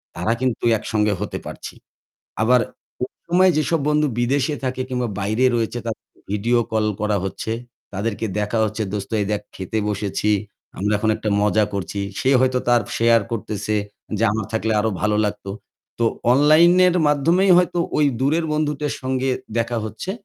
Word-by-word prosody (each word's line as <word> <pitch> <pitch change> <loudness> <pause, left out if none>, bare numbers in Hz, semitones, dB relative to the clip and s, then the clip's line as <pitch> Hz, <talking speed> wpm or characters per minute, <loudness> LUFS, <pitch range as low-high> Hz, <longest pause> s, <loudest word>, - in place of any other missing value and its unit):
তারা 90 +7 0
কিন্তু 130 -3 -1
একসঙ্গে 105 -1 0
হতে 105 - -3
পারছি। - - -8 0.7
আবার 125 +2 +4 0.4
ওই - - -4 0.2
সময় 185 +2 +4
যেসব 155 +2 +1
বন্ধু 150 0 +2
বিদেশে 140 +4 +1
থাকে 130 0 -2
কিংবা 125 -1 -1
বাইরে 110 +6 +1
রয়েছে 115 +1 -1
তাদেরকে 110 - -8
ভিডিও 115 +4 +1
কল 110 -1 +1 0.2
করা 105 -1 +1
হচ্ছে। 95 +3 -4 0.4
তাদেরকে 105 +3 -2
দেখা 105 +2 -1
হচ্ছে 110 +1 -3
দোস্ত 100 +1 -4
এই - - 0
দেখ 105 - -1
খেতে 95 +3 -4
বসেছি। 105 +1 -1 0.5
আমরা 105 +2 +1
এখন 110 +2 0
একটা 110 -1 -3
মজা 105 +1 +3
করছি। 100 +1 -3 0.2
সে 130 - +1
হয়তো 130 -1 +2
তার 120 -1 +5 0.2
শেয়ার 115 -1 +4
করতেছে 110 -1 -2 0.4
যে 115 - 0
আমার 110 -2 -2
থাকলে 110 0 0
আরো 110 +1 +1
ভালো 105 0 +2
লাগতো। 105 -1 -6 0.5
তো 115 - +3 0.3
অনলাইনের 170 +6 +5
মাধ্যমেই 165 +7 +3
হয়তো 180 -1 +2 0.2
ওই 150 - +4
দূরের 155 +5 +1
বন্ধুদের 150 -1 -1
সঙ্গে 130 0 -1 0.3
দেখা 115 0 0
হচ্ছে। 180 - -5
115 Hz, 160 wpm, -21 LUFS, 105-145 Hz, 0.7 s, তার